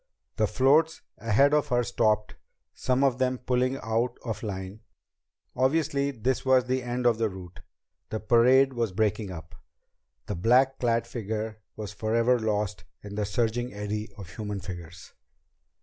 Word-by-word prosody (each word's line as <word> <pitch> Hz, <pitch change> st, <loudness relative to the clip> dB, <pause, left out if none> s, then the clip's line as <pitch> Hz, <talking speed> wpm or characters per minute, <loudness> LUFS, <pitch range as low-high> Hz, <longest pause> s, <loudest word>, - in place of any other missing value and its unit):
The -, -, +2 dB
floats 155 Hz, +5 st, +3 dB, 0.2 s
ahead 125 Hz, +6 st, +3 dB
of 150 Hz, -1 st, +3 dB
her 120 Hz, -1 st, +2 dB
stopped, 110 Hz, -3 st, +1 dB, 0.4 s
some 130 Hz, +1 st, 0 dB
of 135 Hz, -2 st, +2 dB
them 130 Hz, 0 st, +1 dB
pulling 125 Hz, +1 st, 0 dB
out 115 Hz, +3 st, 0 dB
of 115 Hz, -3 st, -4 dB
line. 95 Hz, -1 st, -5 dB, 0.8 s
Obviously 140 Hz, +1 st, +1 dB
this 130 Hz, 0 st, -1 dB
was 130 Hz, -1 st, +4 dB
the 130 Hz, +1 st, 0 dB
end 120 Hz, 0 st, -3 dB
of 115 Hz, -2 st, +3 dB
the 110 Hz, -1 st, +1 dB
route. 90 Hz, -2 st, -10 dB, 0.5 s
The 110 Hz, -, -3 dB
parade 125 Hz, +5 st, +4 dB
was 115 Hz, -5 st, -1 dB
breaking 105 Hz, 0 st, 0 dB
up. 80 Hz, -3 st, -9 dB, 0.7 s
The -, -, -3 dB
black 125 Hz, +8 st, +3 dB
clad 115 Hz, -1 st, +1 dB
figure 110 Hz, -2 st, -4 dB, 0.2 s
was 105 Hz, -1 st, -6 dB
forever 115 Hz, +3 st, +2 dB
lost 105 Hz, -2 st, -1 dB, 0.2 s
in 100 Hz, 0 st, -8 dB
the 105 Hz, 0 st, -2 dB
surging 120 Hz, +2 st, -1 dB
eddy 105 Hz, +1 st, -4 dB
of 95 Hz, -4 st, -9 dB
human 105 Hz, -2 st, -4 dB
figures. 90 Hz, -3 st, -9 dB
115 Hz, 150 wpm, -27 LUFS, 105-130 Hz, 0.8 s, was